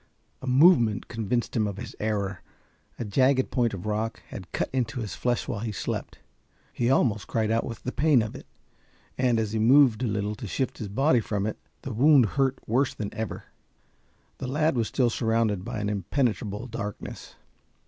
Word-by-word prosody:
A 130 - -7
movement 125 - +5
convinced 115 +1 -2
him 110 -3 +2
of 100 -2 -5
his - - -7
error. 100 -3 -2 0.6
A 120 - -4
jagged 130 +5 +2
point 120 -3 +1
of 90 - -8
rock 110 +1 -2
had 90 -4 -9
cut - - -1
into 125 -2 -1
his 110 -4 -4
flesh 120 -1 -1
while 100 - -3
he 110 +1 -3
slept. 105 - -4 0.6
He 120 0 0
almost 115 -6 +2
cried 110 -1 0
out 115 0 +2
with 115 - -7
the 125 - -2
pain 145 -6 +3
of 110 - -5
it, - - -11 0.7
and 125 -3 +2
as 110 -2 -1
he 110 - -1
moved 125 0 +5
a 125 - +1
little 105 0 -1
to 115 - -6
shift 130 +6 -2
his 105 - -4
body 130 +5 +3
from 105 -2 -2
it, 110 - -3 0.2
the 135 - -4
wound 135 +2 +6
hurt 135 +1 +1
worse 125 +4 +1
than 105 -2 -5
ever. 110 -1 -4 1.0
The 130 - -4
lad 155 +3 +1
was 115 -3 +1
still 120 +1 +1
surrounded 110 -4 0
by 105 - -4
an 105 - -2
impenetrable 105 +1 -1
darkness. 105 -4 -7
115 Hz, 190 wpm, -26 LUFS, 105-130 Hz, 1.0 s, wound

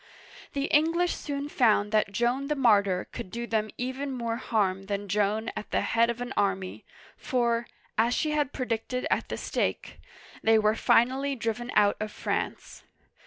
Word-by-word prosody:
The 275 - -1
English 330 +4 +2
soon 285 -1 -4
found 215 -7 +2
that 215 -2 +2
Joan 240 +6 0
the 300 - 0
martyr 200 -8 +3
could - - -7
do 235 +4 -4
them 215 -2 -1
even 260 +3 -3
more 235 -3 -2
harm 195 -5 0
than 200 0 -3
Joan 210 +3 0
at - - -6
the - - +1
head 230 +1 +2
of 235 +1 -3
an 245 +1 -4
army, 195 -2 -1 0.3
for, 235 -2 0 0.3
as 235 +2 +3
she 305 - 0
had 295 -3 0
predicted 250 0 -2
at - - 0
the - - -3
stake, - - -2 0.4
they 225 0 +5
were 215 0 +3
finally 265 +5 +2
driven 235 0 -3
out 205 -1 +4
of 215 0 -3
France. - - -4
235 Hz, 165 wpm, -28 LUFS, 210-260 Hz, 0.4 s, they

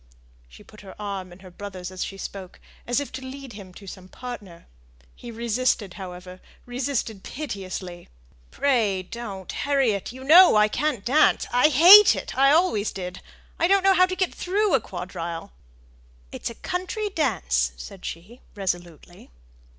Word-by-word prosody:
She - - -15
put 215 - -16
her 195 0 -13
arm 195 -3 -5
in 175 +2 -15
her 185 -1 -13
brother's 185 -1 -8
as 185 - -4
she 195 - -7
spoke, 195 -2 -8 0.3
as 245 +2 +1
if 285 - -6
to - - -7
lead 265 -1 -9
him 200 -3 -11
to 200 - -12
some 185 -1 -10
partner. 205 -7 -9 0.5
He 240 - -11
resisted, 230 -3 -1
however 180 -1 -9 0.2
resisted 245 -4 -3
piteously. 185 - -7 0.4
"Pray 220 -9 +1
don't, 195 -2 -7
Harriet. 265 -10 0
You 260 +2 -11
know 340 +2 +8
I 210 0 +4
can't 285 -5 -2
dance. 285 +6 +3
I 250 +4 +5
hate 360 +9 +9
it; - - -6
I 275 +1 +5
always 300 - +2
did. 185 -2 -7 0.4
I 340 - +3
don't 390 0 +3
know 390 0 +5
how 370 0 +5
to 370 - -4
get 370 -1 -1
through 405 +2 0
a 270 - +4
quadrille." 175 -1 -6 0.8
"It's - - -5
a 235 - -10
country 370 - -3
dance!" 60 - 0
said - - -10
she, 195 +10 -8
resolutely. 175 -3 -6
215 Hz, 160 wpm, -24 LUFS, 185-275 Hz, 0.8 s, hate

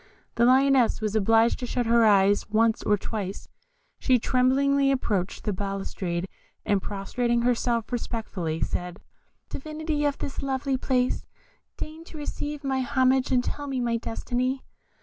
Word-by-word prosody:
The 235 - +3
Lioness 265 -1 +4
was 215 -1 -2
obliged 225 +2 +3
to 245 - -4
shut 245 0 -1
her 230 0 +4
eyes 200 -1 +4
once 220 +1 +2
or 210 - +2
twice: 200 -2 -5 0.5
she 255 -2 +3
tremblingly 275 +3 +2
approached 205 -8 -1
the 210 - -1
balustrade, 190 -2 -3 0.4
and 200 -2 +2
prostrating 235 +5 -1
herself, 235 -1 0
respectfully 200 -9 -3
said, 180 +1 -3 0.5
"Divinity 310 +1 -3
of 285 -1 0
this 275 - -5
lovely 270 0 -1
place, 255 -1 0 0.5
deign 315 +1 -7
to 320 - -11
receive 295 0 -5
my 265 -1 0
homage, 260 0 +2
and 250 -1 +3
tell 290 +2 -4
me 270 -2 -2
my 235 -1 0
destiny." 250 +3 -2
245 Hz, 145 wpm, -26 LUFS, 210-270 Hz, 0.5 s, Lioness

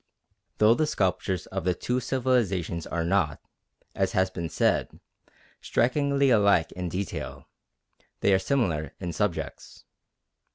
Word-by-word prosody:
Though 110 +1 +6
the 155 +5 +1
sculptures 95 - -1
of 95 0 -4
the 90 -1 +1
two 125 +7 -1
civilisations 115 - 0
are 85 0 -2
not, 85 -5 +1 0.5
as - - 0
has 95 0 +2
been 85 -3 -4
said, - - 0 0.6
strikingly 140 +2 +2
alike 100 -7 +4
in 90 -1 -4
detail, 95 +4 -5 0.8
they 100 - +4
are 95 - +4
similar 95 - -1
in 90 -2 -4
subjects. 100 0 -3
95 Hz, 125 wpm, -27 LUFS, 85-120 Hz, 0.8 s, Though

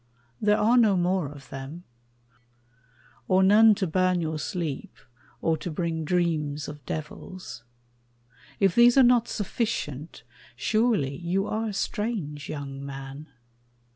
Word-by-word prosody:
There 210 0 +3
are 230 +4 +4
no 210 -5 +4
more 180 -2 +1
of 140 -2 -13
them 135 +6 -8 1.4
Or 190 0 +4
none 210 +2 +7
to 195 -1 -1
burn 185 +1 +1
your 160 -2 -2
sleep, 155 -2 -4 0.5
or 160 -1 +2
to 175 - -5
bring 165 -1 -2
dreams 155 -4 0
Of 150 -2 -9
devils. 155 -3 -7 1.0
If 195 -3 +3
these 240 +3 +6
are 265 - +8
not 240 -1 +4
sufficient, 185 - -3 0.3
surely 215 - +1
You 180 +3 -1
are 220 +1 -2
a 210 - -4
strange 195 -9 -3
young 140 -2 -6
man. 135 +2 -8
175 Hz, 130 wpm, -26 LUFS, 150-210 Hz, 1.4 s, are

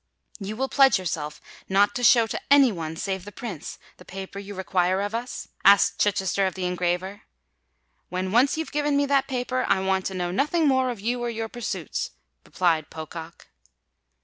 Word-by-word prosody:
"You 205 +1 -5
will 265 +4 -1
pledge 270 -3 +5
yourself 160 -5 -4 0.3
not 200 +2 +3
to 245 - -4
show 235 -1 +6
to 225 - -4
any 280 -3 +6
one, 160 -4 -5
save 190 +2 -3
the 205 - -9
Prince, 200 -8 -7 0.2
the - - -14
paper 195 +1 -8
you 200 0 -8
require 185 0 +1
of 205 +2 -2
us?" 240 +2 -5
asked 200 0 +5
Chichester 195 -1 +1
of 185 - -4
the 185 -1 -3
engraver. 180 +2 -2 0.9
"When 185 +1 -3
once 255 +7 +3
you've 320 - -4
given 295 -1 +1
me 285 - +3
that 275 -1 +2
paper, 255 -1 -1
I 190 - +3
want 190 0 0
to 190 - -5
know 175 -1 -2
nothing 300 - +1
more 260 -2 +3
of 240 -4 -5
you 240 +3 -1
or 240 - -1
your 225 -1 -4
pursuits," 240 -1 -4 0.3
replied 165 -4 0
Pocock. 160 +1 -9
200 Hz, 185 wpm, -25 LUFS, 185-245 Hz, 0.9 s, show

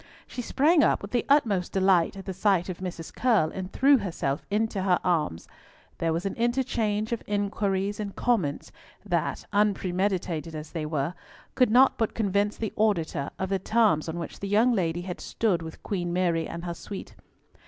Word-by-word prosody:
She 250 - -6
sprang 300 +6 +3
up - - +2
with 200 - -7
the 240 -2 0
utmost 215 -11 +2
delight 190 -2 +3
at 195 - -8
the 190 - -4
sight 190 -1 +1
of 180 - -5
Mrs. 175 -3 -6
Curll, 220 -11 +2
and 185 0 -6
threw 275 0 +5
herself 165 -8 -2
into 210 -1 0
her 185 -2 +3
arms. 155 - 0 0.5
There 165 -1 +1
was 165 +4 -2
an 195 - -1
interchange 230 -3 0
of 235 - -1
inquiries 205 -1 -1
and 205 -2 -4
comments 190 -13 0 0.3
that—unpremeditated 185 -5 -1
as 155 0 -7
they 155 -3 -3
were—could 165 - -2
not 255 +4 +5
but 225 - 0
convince 205 -1 0
the 220 -2 -3
auditor 180 - 0
of 190 - -3
the 195 -1 0
terms 205 -7 +2
on 160 - -4
which 170 -3 -6
the 200 - -4
young 220 +5 +4
lady 175 -4 0
had 180 0 -6
stood 195 -7 0
with 160 -1 -9
Queen 175 -4 -2
Mary 175 -2 +1
and 170 +1 -6
her 170 - -3
suite. 195 +3 -8
195 Hz, 175 wpm, -27 LUFS, 170-215 Hz, 0.5 s, threw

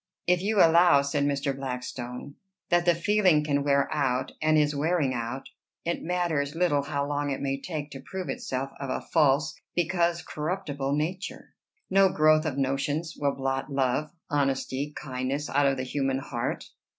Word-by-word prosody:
"If 180 0 +3
you 210 +2 0
allow," 165 -3 +6
said 140 0 0
Mr. 140 -1 0
Blackstone, 125 0 -5 0.4
"that 175 0 +3
the 175 -1 +4
feeling 185 -3 +3
can 145 -1 0
wear 140 -1 +3
out, 130 -4 0
and 155 0 +3
is 150 -1 +2
wearing 150 -2 +1
out, 120 +2 -4 0.4
it 170 - -1
matters 165 -5 -1
little 165 -4 +2
how 140 0 -2
long 145 0 -1
it 135 - -2
may 135 0 -2
take 150 -4 -5
to 135 - -7
prove 185 +6 -6
itself 135 +1 -3
of 140 -1 -4
a - - -1
false, 150 -1 +3 0.2
because 175 0 +1
corruptible 150 -4 -2
nature. 170 +6 -4 0.3
No 195 0 +5
growth 155 -1 +4
of 140 -3 -3
notions 145 +4 -1
will 140 -1 0
blot 135 +1 -2
love, 135 +2 0 0.2
honesty, 140 0 -1
kindness, 135 +1 -3
out 140 0 +3
of 135 -1 +1
the 130 - -2
human 135 0 -1
heart." 120 -3 -3
145 Hz, 165 wpm, -27 LUFS, 135-165 Hz, 0.4 s, allow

